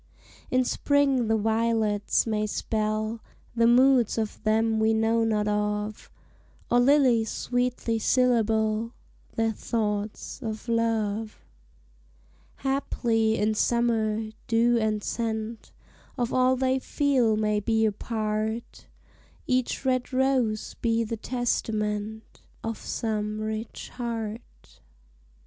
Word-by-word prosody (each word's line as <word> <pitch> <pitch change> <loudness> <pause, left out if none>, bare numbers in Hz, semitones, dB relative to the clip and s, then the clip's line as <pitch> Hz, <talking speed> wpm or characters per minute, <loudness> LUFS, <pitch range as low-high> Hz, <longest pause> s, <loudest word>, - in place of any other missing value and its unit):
In 255 0 +3
spring 275 -3 +2
the 220 0 +2
violets 220 -1 +1
may 215 -2 0
spell 215 +1 -2 0.3
The 230 0 +4
moods 250 -1 +4
of 220 -2 -3
them 220 +1 +2
we 220 0 +3
know 225 +1 +2
not 215 -2 +1
of; 210 0 -2 0.6
Or 245 - +5
lilies 245 -4 +4
sweetly 245 -2 -1
syllable 225 -2 +2 0.4
Their 225 0 +1
thoughts 210 +1 -3
of 220 -1 -5
love 225 -2 -1 1.2
Haply, 230 -5 +1
in 210 +1 +1
summer, 220 -1 +1 0.2
dew 235 +1 +3
and 215 -1 0
scent 225 -1 -3 0.5
Of 240 -1 -1
all 255 0 +4
they 260 0 +1
feel 260 -6 +1
may 210 -1 +1
be 220 +1 +1
a 215 - +2
part; 215 +1 -3 0.6
Each 255 +1 -1
red 255 -1 0
rose 255 -5 +1
be 230 -1 +2
the 230 +1 -3
testament 215 -3 -2 0.2
Of 225 -1 -4
some 215 -1 -3
rich 215 +1 -5
heart. 230 -2 -6
225 Hz, 110 wpm, -26 LUFS, 215-240 Hz, 1.2 s, Or